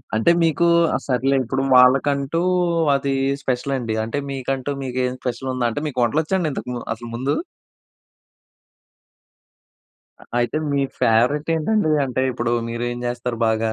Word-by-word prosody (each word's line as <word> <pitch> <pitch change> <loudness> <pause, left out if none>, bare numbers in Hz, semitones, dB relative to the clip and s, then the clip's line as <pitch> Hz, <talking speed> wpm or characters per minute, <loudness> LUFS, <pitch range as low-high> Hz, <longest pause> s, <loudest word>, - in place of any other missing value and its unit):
అంటే 110 +10 +4
మీకు 165 +1 +2 0.3
ఆ - - +2
సరేలే! 135 +1 +1
ఇప్పుడు 135 +3 -2
వాళ్ళకంటూ 135 +4 +4 0.5
అది 140 0 -1 0.3
స్పెషలండి. 125 -3 -2
అంటే 115 +6 -3
మీకంటూ 135 +1 -3
మీకేం 125 -1 -1
స్పెషలుందా? 130 0 -2
అంటే 145 - -4
మీకు 125 -4 -2
వంటలొచ్చాడి 160 - 0
ఇంతకు 125 - -5
ముం 120 - -5
అసలు 120 +1 -9
ముందు? 135 +4 -1 2.9
అ - - -13
అయితే 120 +3 0
మీ 140 0 +1 0.2
ఫేవరేట్ 125 +8 +2
ఏంటండి 160 +1 +1
అంటే 130 0 -1
ఇప్పుడు 120 -1 -1 0.2
మీరేం 120 +1 -3
జేస్తారు 120 -1 -3
బాగా? 110 0 +1
130 Hz, 125 wpm, -21 LUFS, 120-140 Hz, 2.9 s, అంటే